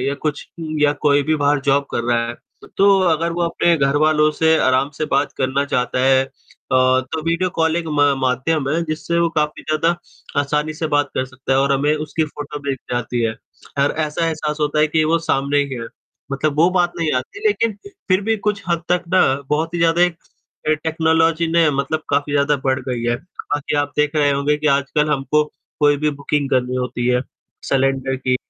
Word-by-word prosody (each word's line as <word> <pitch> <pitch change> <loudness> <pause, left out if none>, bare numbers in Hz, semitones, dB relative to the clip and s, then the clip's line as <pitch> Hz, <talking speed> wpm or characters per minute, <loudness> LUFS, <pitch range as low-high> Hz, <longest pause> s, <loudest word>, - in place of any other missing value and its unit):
या 140 +2 -1
कुछ 150 0 -4 0.3
या 145 0 +4
कोई 145 -1 +4
भी 155 +2 +1
बाहर 145 -1 +2
जॉब 140 0 +2
कर 120 - -2
रहा 120 -1 +1
है, 120 - -5 0.4
तो 195 0 +5
अगर 165 +1 +1
वो 175 +1 -2
अपने 170 0 +2
घरवालों 150 +2 +3
से 160 +1 +3
आराम 130 +2 +2
से 155 - 0
बात - - 0
करना 135 +2 0
चाहता 125 -2 -1
है, 135 0 +4 0.5
तो 130 +4 +2
वीडियो 170 +2 0
कॉलिंग 165 +1 0
म 145 -1 +4
माध्यम 135 +3 0
है 165 +3 0
जिससे 165 +2 -2
वो 170 0 +3
काफ़ी 150 0 -1
ज़्यादा 160 +2 0 0.4
आसानी 150 +2 -1
से 160 0 -2
बात 145 -2 +1
कर 130 - 0
सकता 130 +1 -4
है 135 - +3
और 140 0 +2
हमें 145 +3 +2
उसकी 155 +1 -2
फोटो 145 0 -7
दिख 135 - -1
जाती 120 0 -2
है 110 -1 0 0.5
और - - +1
ऐसा 165 +2 -2
एहसास 155 -2 -2
होता 150 0 0
है 155 - +5
कि 155 +1 +1
वो 165 +2 +2
सामने 140 -3 0
ही 140 -2 -1
है, 115 -1 -5 0.5
मतलब 145 +2 -1
वो 170 +3 +6
बात 175 -1 +1
नहीं 160 -2 0
आती 400 - -9
लेकिन 230 - +1 0.3
फिर 185 +1 +3
भी 225 +2 +1
कुछ 200 -2 -1
हद 170 -1 0
तक 180 0 +1
ना 185 - +6 0.3
बहुत 160 +3 -1
ही - - -1
ज़्यादा 165 +1 +3
एक 175 -2 +2 0.7
टेक्नोलॉजी 160 +1 +2
ने 170 -2 +4
मतलब 145 +3 -2
काफ़ी 145 +1 0
ज़्यादा 145 0 +2
बढ़ 130 -1 +1
गई 120 -2 -2
है। 120 0 +1
बाकी 145 -1 -4
आप 145 0 0
देख 150 +1 +1
रहे 145 -1 +3
होंगे 140 +1 +1
कि 150 - -2
आजकल 140 +2 +1
हमको 150 +2 +1 0.4
कोई 145 0 +4
भी 150 +1 0
बुकिंग 140 0 -1
करनी 125 0 +1
होती 125 -1 -2
है 125 0 +2 0.5
सिलेंडर 135 0 +1
की, 130 -1 0
150 Hz, 200 wpm, -19 LUFS, 135-160 Hz, 0.7 s, वो